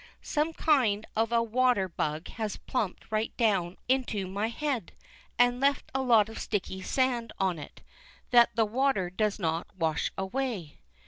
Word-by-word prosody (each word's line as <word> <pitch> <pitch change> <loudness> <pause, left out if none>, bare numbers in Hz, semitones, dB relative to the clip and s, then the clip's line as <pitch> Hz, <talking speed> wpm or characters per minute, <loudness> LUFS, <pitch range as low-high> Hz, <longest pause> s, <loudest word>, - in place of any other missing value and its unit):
Some 305 +2 0
kind 235 -11 +2
of 225 +1 +1
a 230 -1 +3
water 235 -3 +2
bug 155 -1 -3
has 215 -3 -4
plumped 215 -5 -3
right 215 +1 -1
down 195 -7 +1
onto 245 -6 0
my 200 +4 -2
head, 265 0 -3 0.4
and 245 0 +4
left 280 0 +1
a 265 - 0
lot 230 -5 +5
of 225 - -8
sticky 190 -2 -3
sand 245 +1 0
on 185 -4 0
it, - - -11 0.5
that 240 -1 +6
the 225 -1 +3
water 220 -5 +1
does 210 +2 0
not 165 -3 -1
wash 160 -4 0
away. 190 - -3
220 Hz, 155 wpm, -29 LUFS, 190-250 Hz, 0.5 s, that